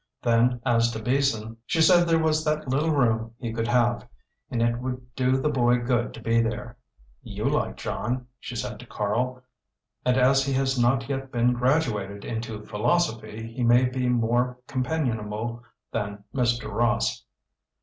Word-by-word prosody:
Then 120 +1 +3
as 115 -2 +3
to 110 - -4
Beason, 115 -2 0
she 165 - 0
said 175 +2 +6
there 165 -1 +4
was 155 -1 +1
that 155 -1 -1
little 140 +5 +1
room 115 -6 +1
he 115 -3 -5
could 115 0 -1
have, 120 0 +1 0.4
and 120 - -2
it 120 0 +1
would 125 0 -6
do 130 0 +2
the 135 - 0
boy 120 -3 +3
good 120 0 0
to - - -9
be 115 0 +3
there. 115 +1 -3 0.5
"You - - -6
like - - 0
John," 125 +2 -3
she 125 - -7
said - - -4
to 125 - -11
Karl, 125 +5 -2 0.6
"and 125 0 +2
as 135 +1 +4
he 135 0 -1
has 135 0 +1
not 125 +2 +2
yet 135 -1 -4
been 120 +1 +2
graduated 120 -7 0
into 110 -2 -5
philosophy, 110 -2 -1
he 125 - -5
may 120 +1 +5
be 125 0 -1
more 120 +1 +1
companionable 120 -5 -2 0.3
than 100 0 -4
Mr. 120 -4 0
Ross." 120 +1 +1
120 Hz, 165 wpm, -26 LUFS, 115-130 Hz, 0.6 s, said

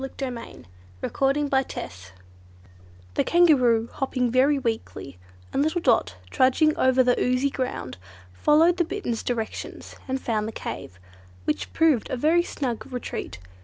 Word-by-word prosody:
Chapter 270 -1 -4
9 235 - -9 0.4
The - - -2
Kangaroo's 275 -1 +1
Story 90 +1 -8 1.0
The - - +1
Kangaroo, 255 -10 +4
hopping 255 -2 -1
very 270 +4 +4
weakly, 225 - -4 0.3
and 275 - +1
little 315 +4 +1
Dot 230 - +2 0.2
trudging 300 +4 +3
over 260 0 +4
the 245 0 +2
oozy 255 +3 +1
ground, 255 - -4 0.4
followed 320 - +4
the 345 - +3
Bittern's 330 - -3
directions 230 -3 -5
and 265 0 -1
found 215 -4 -1
the - - -4
cave, 90 - -7 0.5
which 150 - -2
proved 315 -8 +2
a 255 - -2
very 320 +7 +3
snug 265 -7 -4
retreat. 240 - -5
255 Hz, 140 wpm, -25 LUFS, 230-295 Hz, 1.0 s, Kangaroo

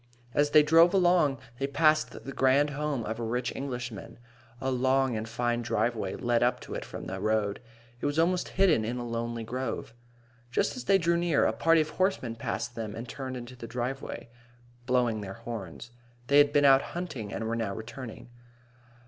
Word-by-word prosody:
As 145 0 +3
they 150 0 +7
drove 165 +4 +6
along, 175 -7 +4 0.2
they 135 - 0
passed 155 +2 +2
the 135 - -5
grand 140 +3 +3
home 145 -3 -2
of 110 +2 -4
a - - -3
rich 120 +2 -2
Englishman. 120 -4 -6 0.4
A 130 - -1
long 130 0 +2
and 110 +1 -4
fine 120 +1 -1
driveway 115 -3 -1
led 120 -1 +1
up 125 0 +2
to - - -8
it - - -4
from - - -8
the 95 +1 -5
road. 105 0 0 0.4
It - - -1
was 145 +1 -2
almost 175 +2 +2
hidden 180 - +4
in 120 +3 -3
a 120 - -4
lovely 115 0 -3
grove. 125 0 -4 0.6
Just 120 - 0
as 255 - -7
they 195 - +5
drew 170 -1 +2
near, 170 -3 +2
a - - +2
party 165 -1 +4
of 155 - -3
horsemen 185 - 0
passed 120 +1 -3
them 110 -3 -5
and 115 +2 -6
turned 130 0 -5
into 120 +1 -9
the 115 -2 -8
driveway, 125 +2 -4 0.6
blowing 120 -4 +1
their 95 -1 -7
horns. 115 -2 -7 0.4
They 140 +1 +6
had 145 0 +5
been 145 -1 +4
out 135 -1 +7 0.2
hunting 135 - -5
and 110 - -3
were 115 - -1
now 110 -4 -2
returning. 120 +1 -8
125 Hz, 190 wpm, -29 LUFS, 115-145 Hz, 0.6 s, they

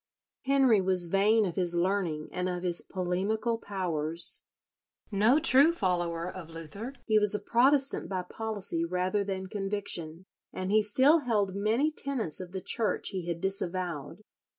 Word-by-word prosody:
Henry 265 -6 +3
was 185 -1 +3
vain 210 +4 +3
of 175 -3 -4
his 175 -2 +1
learning 170 -4 -1
and 180 0 -3
of 180 0 -4
his 175 -1 +1
polemical 200 +5 -2
powers. 170 -5 -1 0.7
No 215 +7 +3
true 300 0 +6
follower 175 - -2
of 180 -3 -9
Luther, 165 - -8
he 215 -1 +3
was 210 0 +4
a - - -1
Protestant 270 +3 +2
by 185 -2 -3
policy 205 -4 -4
rather 185 +4 -1
than 190 -1 -4
conviction, 195 -4 -4 0.3
and 185 +1 -4
he 215 +1 +4
still 260 +10 +6
held 210 -8 -1
many 220 +10 0
tenets 265 - -3
of 180 -1 -8
the 190 0 -5
Church 215 +3 -1
he 185 -4 -6
had 170 -1 -3
disavowed. 185 -3 -3
195 Hz, 150 wpm, -28 LUFS, 180-220 Hz, 0.7 s, true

